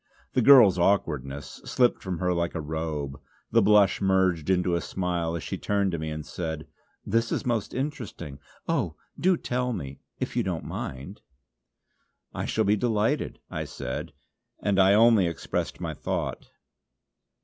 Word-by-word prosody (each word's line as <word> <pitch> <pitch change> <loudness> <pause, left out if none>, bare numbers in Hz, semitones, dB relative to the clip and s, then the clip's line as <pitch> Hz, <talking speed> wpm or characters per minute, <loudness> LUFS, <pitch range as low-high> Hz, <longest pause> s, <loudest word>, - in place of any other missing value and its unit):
The 130 - +3
girl's 115 -8 +8
awkwardness 75 -8 0
slipped 125 -1 +2
from 95 -2 -3
her 90 +1 0
like 85 0 -1
a - - -1
robe; 75 -3 -4 0.3
the 115 - +5
blush 105 -1 +4
merged 95 -4 +2
into 90 -1 +2
a 85 - +1
smile 85 -2 -2
as 85 - -4
she - - -4
turned 100 -2 0
to 85 - -3
me 80 0 -3
and 75 -1 -5
said: 80 -3 -5 0.4
"This 115 +2 +1
is - - -1
most 115 -4 -1
interesting. 125 - -5 0.3
O! - - 0 0.2
do 185 0 +3
tell 125 -2 -1
me 70 -9 -6 0.2
if - - -3
you - - +2
don't - - -3
mind." 70 +10 -6 1.1
"I - - -3
shall 110 - +1
be 105 +2 +4
delighted" 115 +5 0
I - - -3
said, 65 - -5 0.5
and 100 -2 +1
I 95 +1 +6
only 110 -4 +5
expressed 85 - -3
my - - -3
thought. - - -4
95 Hz, 160 wpm, -27 LUFS, 80-110 Hz, 1.1 s, girl's